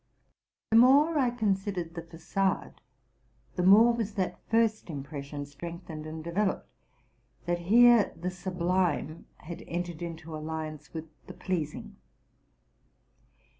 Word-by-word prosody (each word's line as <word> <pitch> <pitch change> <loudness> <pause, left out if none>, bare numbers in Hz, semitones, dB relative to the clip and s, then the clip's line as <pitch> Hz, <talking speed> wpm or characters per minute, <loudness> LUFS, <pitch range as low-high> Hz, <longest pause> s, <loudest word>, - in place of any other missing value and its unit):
The 225 - +6
more 285 +6 +6
I 255 -3 +3
considered 195 -7 -1
the 170 - -5
facade, 170 +4 -2 0.7
the 180 - 0
more 215 +6 +7
was 225 -3 -3
that 185 -2 -2
first 225 -3 +1
impression 145 -1 -6
strengthened 155 +1 -8
and 155 0 -7
developed, 190 +4 -1 0.8
that 175 0 0
here 240 -1 +7
the 180 +2 -2
sublime 180 -3 -1
has 170 +2 -8
entered 175 -1 -4
into 165 -2 -6
alliance 155 -1 -6
with 160 -1 -6 0.2
the - - -9
pleasing. 165 -6 -4
175 Hz, 115 wpm, -29 LUFS, 160-205 Hz, 0.8 s, more